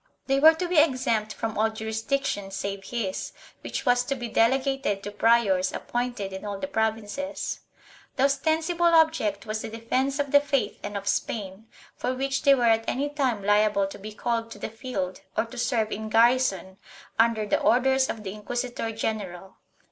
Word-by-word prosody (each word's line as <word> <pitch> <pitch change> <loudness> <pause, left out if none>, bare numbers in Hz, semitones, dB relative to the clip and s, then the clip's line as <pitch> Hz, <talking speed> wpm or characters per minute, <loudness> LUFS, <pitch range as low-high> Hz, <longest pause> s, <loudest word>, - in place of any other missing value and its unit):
They 270 0 +2
were 320 +3 +8
to 355 +2 -2
be 350 -3 +4
exempt 255 -7 +2
from 225 0 -4
all 220 +1 +3
jurisdiction 220 0 -2
save 195 0 -5
his, 205 -4 -3 0.3
which - - -5
was 245 -1 +4
to 275 - -1
be 240 -2 -5
delegated 260 -3 +1
to 205 - -5
priors 205 -4 +3
ap - - -7
pointed 240 -5 -2
in 190 - -7
all 205 -1 -4
the 195 - -3
provinces. 225 +4 -2 0.6
The 265 - +1
ostensible 320 +5 +2
object 310 -12 +2
was 215 0 -3
the - - -5
defence 255 +5 -1
of 285 -2 -2
the 285 - +7
faith 285 -2 -1
and 205 0 -4
of 200 0 -7
Spain, 200 0 -2 0.3
for 255 - -2
which 270 +1 -1
they 280 -2 +6
were 250 - -1
at 225 -1 +3
any 280 +3 -1
time 260 -8 -1
liable 205 0 +3
to 195 - -8
be 215 +2 -8
called 230 +1 -2
to 210 - -10
the - - -5
field, 205 -6 -4 0.2
or - - +2
to 235 +2 -11
serve 225 -3 0
in 215 +1 -4
garrison, 225 -5 +2 0.4
under 225 -1 +3
the 205 - +1
orders 265 +2 +3
of 220 - -4
the 190 -2 -5
inquisitor 240 +2 -3
general. 195 -4 -4
230 Hz, 185 wpm, -26 LUFS, 205-270 Hz, 0.6 s, were